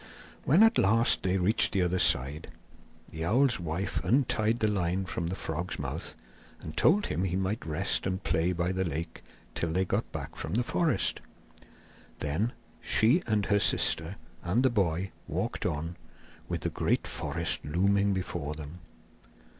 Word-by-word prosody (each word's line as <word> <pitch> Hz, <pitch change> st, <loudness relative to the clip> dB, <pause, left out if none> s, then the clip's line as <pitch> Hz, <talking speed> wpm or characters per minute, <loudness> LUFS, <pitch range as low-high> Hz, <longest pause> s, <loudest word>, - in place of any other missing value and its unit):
When 170 Hz, +10 st, +6 dB
at 225 Hz, +1 st, +5 dB
last 115 Hz, +5 st, +4 dB
they 95 Hz, 0 st, +1 dB
reached 95 Hz, +4 st, +2 dB
the 95 Hz, -, +2 dB
other 90 Hz, +1 st, 0 dB
side, 70 Hz, +4 st, +1 dB, 0.6 s
the 80 Hz, 0 st, -5 dB
owl's 125 Hz, +7 st, +3 dB
wife 85 Hz, +3 st, -3 dB
untied 115 Hz, -3 st, +2 dB
the 110 Hz, -, +1 dB
line 95 Hz, -2 st, 0 dB
from 85 Hz, -1 st, -3 dB
the 90 Hz, -, -3 dB
frog's 85 Hz, 0 st, -4 dB
mouth -, -, -5 dB, 0.4 s
and 80 Hz, -, -8 dB
told 205 Hz, +6 st, +4 dB
him 90 Hz, -, -2 dB
he 90 Hz, -2 st, -1 dB
might 95 Hz, +1 st, -2 dB
rest 85 Hz, +5 st, 0 dB
and 95 Hz, +1 st, -3 dB
play 85 Hz, +3 st, +1 dB
by 90 Hz, 0 st, -1 dB
the 95 Hz, 0 st, -1 dB
lake 80 Hz, 0 st, -5 dB, 0.3 s
till 85 Hz, -, -2 dB
they 95 Hz, +3 st, +1 dB
got -, -, -2 dB
back -, -, -6 dB
from -, -, -4 dB
the 120 Hz, -, +2 dB
forest. 155 Hz, +1 st, 0 dB, 1.0 s
Then 80 Hz, +11 st, -1 dB, 0.3 s
she 115 Hz, -, +3 dB
and 105 Hz, -3 st, +1 dB
her 100 Hz, 0 st, +2 dB
sister 80 Hz, -1 st, +2 dB, 0.3 s
and 100 Hz, +9 st, +1 dB
the 130 Hz, -, +4 dB
boy 95 Hz, -4 st, 0 dB, 0.2 s
walked -, -, -2 dB
on, 80 Hz, +3 st, -4 dB, 0.5 s
with -, -, -2 dB
the -, -, -2 dB
great -, -, 0 dB
forest -, -, -2 dB
looming 100 Hz, +6 st, +2 dB
before 75 Hz, -6 st, -3 dB
them. 75 Hz, +3 st, -9 dB
95 Hz, 160 wpm, -29 LUFS, 85-110 Hz, 1.0 s, When